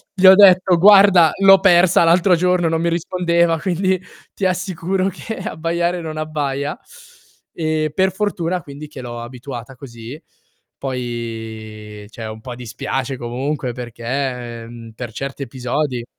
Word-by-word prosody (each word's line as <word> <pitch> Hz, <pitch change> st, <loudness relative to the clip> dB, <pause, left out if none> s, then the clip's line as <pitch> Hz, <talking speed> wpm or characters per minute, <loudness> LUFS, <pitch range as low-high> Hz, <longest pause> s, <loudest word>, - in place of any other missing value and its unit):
Gli 190 Hz, 0 st, +1 dB
ho 190 Hz, -, +11 dB
detto: 185 Hz, -3 st, +6 dB
"Guarda, 195 Hz, -4 st, +7 dB
l'ho 195 Hz, -1 st, +7 dB
persa 180 Hz, -2 st, +5 dB
l'altro 175 Hz, +2 st, +4 dB
giorno, 180 Hz, -1 st, +1 dB
non 165 Hz, 0 st, -1 dB
mi 170 Hz, -, +1 dB
rispondeva, 170 Hz, -1 st, 0 dB
quindi 185 Hz, +1 st, 0 dB, 0.3 s
ti 195 Hz, -, -3 dB
assicuro 185 Hz, +1 st, -1 dB
che 225 Hz, +4 st, -7 dB
abbaiare 170 Hz, +2 st, -2 dB
non 155 Hz, -1 st, -6 dB
abbaia"; 145 Hz, -2 st, -3 dB, 0.8 s
e 155 Hz, -2 st, -1 dB
per 190 Hz, +1 st, +2 dB
fortuna 185 Hz, -4 st, -2 dB
quindi 145 Hz, +1 st, -10 dB
che 140 Hz, -3 st, -10 dB
l'ho 120 Hz, -1 st, -7 dB
abituata 125 Hz, +1 st, -9 dB
così. 120 Hz, +2 st, -10 dB, 0.6 s
Poi 115 Hz, -4 st, -6 dB
cioè 115 Hz, 0 st, -8 dB
un 110 Hz, 0 st, -8 dB
po' 125 Hz, 0 st, -7 dB
dispiace 125 Hz, +2 st, -4 dB
comunque 125 Hz, +2 st, -3 dB
perché, 120 Hz, 0 st, -5 dB
mhmm, 115 Hz, -1 st, -11 dB
per 115 Hz, 0 st, -8 dB
certi 135 Hz, +4 st, -6 dB
episodi 125 Hz, 0 st, -3 dB
150 Hz, 135 wpm, -19 LUFS, 120-180 Hz, 0.8 s, ho